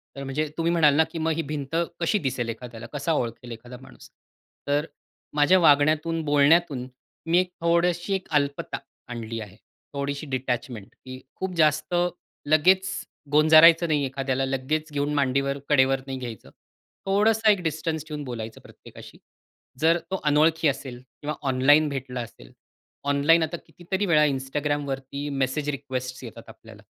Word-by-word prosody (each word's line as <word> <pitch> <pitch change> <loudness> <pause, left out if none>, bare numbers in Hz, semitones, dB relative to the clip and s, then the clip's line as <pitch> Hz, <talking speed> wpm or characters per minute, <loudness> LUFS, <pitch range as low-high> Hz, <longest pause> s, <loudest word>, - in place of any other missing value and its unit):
तर 140 - -6
म्हणजे 140 +3 -2
तुम्ही 165 0 +1
म्हणाल 155 -4 +5
ना 160 - +5
की - - -6
"मग 160 +1 0
ही 165 - -1
भिंत 150 -1 -5 0.2
कशी 175 +5 +1
दिसेल 130 -6 -2
एखाद्याला? 115 0 -8
कसा 145 +3 -1
ओळखेल 120 -3 -3
एखादा 120 +2 -9
माणूस?" 130 -1 -15 0.6
तर 145 +1 +1 0.5
माझ्या 150 +6 +5
वागण्यातून, 155 +1 +3
बोलण्यातून 145 -2 +3 0.4
मी 165 +1 +2
एक 185 0 -1
थोडीशी 170 +2 +1
एक 190 - -5
अल्पता 140 0 -4 0.3
आणली 115 -1 -5
आहे. 100 -2 -10 0.4
थोडीशी 140 +1 -3
डिटॅचमेंट, 125 -5 -3 0.2
की 130 0 -8 0.2
खूप 190 -1 -4
जास्त 155 +1 +2 0.5
लगेच 185 +6 +4 0.4
गोंजारायचं 160 +3 +7
नाही 150 -3 +1
एखाद्याला, 135 0 -2
लगेच 140 +4 -2
घेऊन 145 0 -1
मांडीवर, 140 0 0
कडेवर 135 -2 +4
नाही 135 -1 -4
घ्यायचं. 120 -5 -8 0.6
थोडासा 215 +3 +3
एक 200 -3 0
डिस्टन्स 160 -1 -2
ठेऊन 150 -2 -5
बोलायचं 115 -4 -7
प्रत्येकाशी. - - -14 0.6
जर 165 +3 +4
तो 190 - -1
अनोळखी 155 +2 +3
असेल 135 -3 -3 0.2
किंवा 150 +1 -3
ऑनलाईन 145 +4 +4
भेटला 130 -2 -4
असेल. 60 - -11 0.6
ऑनलाइन 155 +4 +4
आता 160 +2 -3
कितीतरी 180 +5 -3
वेळा 155 -5 +4
Instagramवरती 140 0 -3
मेसेज 140 +2 -1
रिक्वेस्टस 130 -2 -5
येतात 115 - -11
आपल्याला, - - -14
145 Hz, 145 wpm, -25 LUFS, 130-160 Hz, 0.6 s, गोंजारायचं